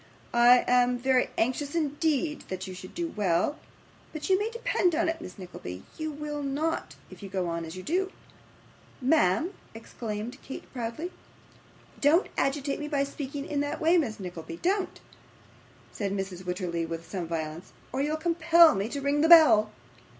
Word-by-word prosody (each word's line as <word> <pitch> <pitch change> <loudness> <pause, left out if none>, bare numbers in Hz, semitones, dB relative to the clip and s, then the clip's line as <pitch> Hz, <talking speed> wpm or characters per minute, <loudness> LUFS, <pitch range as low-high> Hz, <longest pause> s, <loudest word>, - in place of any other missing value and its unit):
I 240 +1 +6
am 250 0 +4
very 255 0 +2
anxious 275 +6 0
indeed 300 -1 0
that 185 0 -4
you 185 - -7
should 185 0 -10
do 340 -1 -2
well, 200 - 0 0.5
but 310 +3 -4
you 375 - +5
may 425 +2 -1
depend 465 -7 +1
upon 335 +1 +2
it, 325 0 -3
Miss 180 - -9
Nickleby, 135 - -8
you 315 -1 -3
will 295 0 -5
not, 290 +4 -2 0.2
if - - -12
you 200 - -7
go 185 -2 -1
on 170 0 -3
as 160 +2 -8
you 185 - -7
do.' 375 - 0 0.9
'Ma'am!' 300 - +2 0.2
exclaimed 225 +2 -6
Kate, 265 - -8
proudly. 245 +8 -4 0.9
'Don't 310 +6 +4
agitate 275 0 0
me 295 - -4
by 285 -2 +1
speaking 280 0 -5
in 295 -2 -2
that 290 0 -2
way, 330 +3 +4
Miss 225 -8 -2
Nickleby, 170 -3 -7
don't,' 385 +1 0 0.9
said 200 -2 -3
Mrs. 190 -2 -4
Wititterly, 180 -2 -2
with 165 0 -5
some 180 -1 -4
violence, 160 0 -5 0.2
'or 265 - -1
you'll 300 +2 0
compel 335 0 +5
me 195 +3 -2
to 280 +2 -4
ring 285 +1 +1
the 320 - +3
bell. 300 -11 +8
270 Hz, 170 wpm, -28 LUFS, 190-315 Hz, 0.9 s, bell